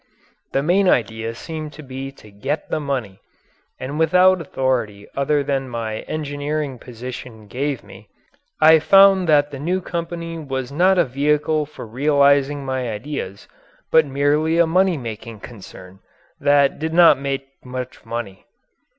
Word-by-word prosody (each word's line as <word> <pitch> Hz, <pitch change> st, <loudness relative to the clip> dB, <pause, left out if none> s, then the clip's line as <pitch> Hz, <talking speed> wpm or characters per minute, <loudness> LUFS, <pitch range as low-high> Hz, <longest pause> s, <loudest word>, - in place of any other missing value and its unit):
The 135 Hz, -, 0 dB
main 185 Hz, +4 st, +3 dB
idea 115 Hz, -, 0 dB
seemed 155 Hz, +2 st, -7 dB
to 155 Hz, -, -11 dB
be 135 Hz, 0 st, -7 dB
to 110 Hz, -5 st, -17 dB
get 135 Hz, +10 st, -4 dB
the -, -, 0 dB
money. 130 Hz, -10 st, -4 dB, 0.6 s
And 130 Hz, +1 st, -5 dB
being 150 Hz, -, -4 dB
without 180 Hz, +3 st, +4 dB
authority 120 Hz, -9 st, -2 dB
other 140 Hz, +1 st, +1 dB
than 135 Hz, -2 st, -2 dB
my 115 Hz, -2 st, -4 dB
engineering 145 Hz, -2 st, -3 dB
position 120 Hz, -2 st, -9 dB
gave 135 Hz, +5 st, -3 dB
me, -, -, -15 dB, 0.5 s
I 160 Hz, +1 st, +7 dB
found 195 Hz, +1 st, +5 dB
that 145 Hz, -1 st, +4 dB
the 135 Hz, -, -7 dB
new 175 Hz, +6 st, -1 dB
company 170 Hz, -1 st, -5 dB
was 135 Hz, -3 st, -4 dB
not 185 Hz, +6 st, +3 dB
a 175 Hz, -, +4 dB
vehicle 150 Hz, +3 st, 0 dB
for 150 Hz, -, -10 dB
realizing 140 Hz, +3 st, +2 dB
my 130 Hz, -2 st, -2 dB
ideas 105 Hz, -4 st, -6 dB, 0.4 s
but 160 Hz, -2 st, +5 dB
merely 145 Hz, +4 st, +1 dB
a 170 Hz, -, +5 dB
money 180 Hz, +1 st, +2 dB
making 115 Hz, -3 st, -8 dB
concern 95 Hz, -4 st, -12 dB, 0.4 s
that 140 Hz, -1 st, +3 dB
did 160 Hz, +1 st, -3 dB
not 170 Hz, -5 st, +7 dB
make 135 Hz, -1 st, -3 dB
much 125 Hz, 0 st, -7 dB
money. 115 Hz, -5 st, -6 dB
140 Hz, 150 wpm, -21 LUFS, 125-155 Hz, 0.6 s, I